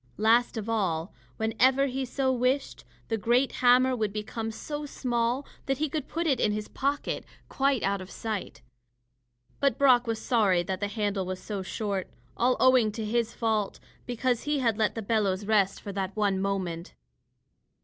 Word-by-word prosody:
Last 230 Hz, +2 st, +3 dB
of 220 Hz, -1 st, -4 dB
all, 185 Hz, -7 st, -1 dB, 0.2 s
whenever 255 Hz, +5 st, +3 dB
he 265 Hz, 0 st, -2 dB
so 260 Hz, +1 st, 0 dB
wished, 255 Hz, +3 st, -1 dB, 0.2 s
the 225 Hz, -1 st, 0 dB
great 245 Hz, +5 st, +2 dB
hammer 255 Hz, +1 st, +5 dB
would 215 Hz, -4 st, -1 dB
become 220 Hz, +2 st, -4 dB
so 295 Hz, +6 st, -5 dB
small 245 Hz, 0 st, -1 dB, 0.2 s
that 270 Hz, -1 st, +1 dB
he 305 Hz, +1 st, -1 dB
could 300 Hz, -1 st, -3 dB
put 335 Hz, +2 st, -2 dB
it 275 Hz, -6 st, +2 dB
in 210 Hz, -, +2 dB
his 210 Hz, 0 st, -4 dB
pocket, 280 Hz, +2 st, -2 dB, 0.3 s
quite 275 Hz, -3 st, +1 dB
out 195 Hz, 0 st, 0 dB
of 185 Hz, -, -9 dB
sight. 200 Hz, -, -5 dB, 1.0 s
But 280 Hz, -1 st, +2 dB
Brock 255 Hz, -3 st, +5 dB
was 225 Hz, -1 st, -1 dB
sorry 200 Hz, -7 st, +2 dB
that 185 Hz, +1 st, -3 dB
the 205 Hz, -, -1 dB
handle 205 Hz, -2 st, -2 dB
was 185 Hz, 0 st, -4 dB
so 205 Hz, -3 st, -5 dB
short 195 Hz, 0 st, -3 dB, 0.3 s
all 250 Hz, +1 st, +2 dB
owing 255 Hz, -4 st, +5 dB
to 220 Hz, 0 st, -4 dB
his 230 Hz, +1 st, -1 dB
fault, 220 Hz, -3 st, -1 dB, 0.3 s
because 245 Hz, 0 st, 0 dB
he 295 Hz, 0 st, +1 dB
had 235 Hz, -5 st, +1 dB
let 215 Hz, -1 st, 0 dB
the 225 Hz, -, -4 dB
bellows 200 Hz, -2 st, 0 dB
rest 200 Hz, -2 st, +2 dB
for 200 Hz, -, -7 dB
that 195 Hz, 0 st, -3 dB
one 200 Hz, -3 st, +1 dB
moment. 185 Hz, -4 st, -3 dB
225 Hz, 175 wpm, -28 LUFS, 200-255 Hz, 1.0 s, hammer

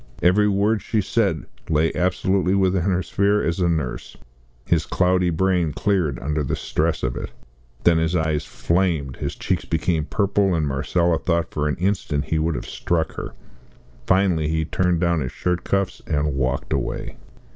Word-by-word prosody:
Every 100 Hz, +4 st, +4 dB
word 105 Hz, +2 st, +2 dB
she 110 Hz, -, -1 dB
said 95 Hz, -, 0 dB, 0.2 s
lay 80 Hz, +1 st, +2 dB
absolutely 95 Hz, +1 st, +1 dB
within 95 Hz, -1 st, +2 dB
her 90 Hz, -1 st, +1 dB
sphere 100 Hz, +3 st, +1 dB
as 85 Hz, +2 st, -1 dB
a 90 Hz, -1 st, +2 dB
nurse. 75 Hz, -7 st, -3 dB, 0.5 s
His -, -, +1 dB
cloudy 90 Hz, 0 st, +2 dB
brain 85 Hz, -2 st, +1 dB
cleared 90 Hz, -10 st, 0 dB
under 75 Hz, +4 st, -2 dB
the 65 Hz, -, -1 dB
stress -, -, -1 dB
of -, -, -1 dB
it. -, -, -5 dB, 0.5 s
Then 85 Hz, -1 st, +5 dB
his 80 Hz, +2 st, 0 dB
eyes 80 Hz, -2 st, 0 dB
flamed, 85 Hz, -7 st, -1 dB
his -, -, -4 dB
cheeks -, -, -1 dB
became 80 Hz, -1 st, 0 dB
purple, 100 Hz, -1 st, +1 dB
and 80 Hz, -2 st, 0 dB
Marcella 80 Hz, +5 st, +1 dB
thought 85 Hz, -1 st, 0 dB
for 75 Hz, 0 st, -1 dB
an 75 Hz, -, 0 dB
instant 85 Hz, -5 st, -1 dB
he 80 Hz, -, 0 dB
would 80 Hz, 0 st, 0 dB
have -, -, -4 dB
struck 85 Hz, -2 st, -1 dB
her. -, -, -7 dB, 0.7 s
Finally 90 Hz, -5 st, +3 dB
he 80 Hz, 0 st, 0 dB
turned 90 Hz, +1 st, +1 dB
down 85 Hz, -1 st, +2 dB
his 65 Hz, -4 st, -3 dB
shirt 90 Hz, -1 st, -1 dB
cuffs 100 Hz, -1 st, -1 dB
and 75 Hz, -1 st, 0 dB
walked 65 Hz, -1 st, -1 dB
away. -, -, -3 dB
85 Hz, 170 wpm, -22 LUFS, 80-95 Hz, 0.7 s, Then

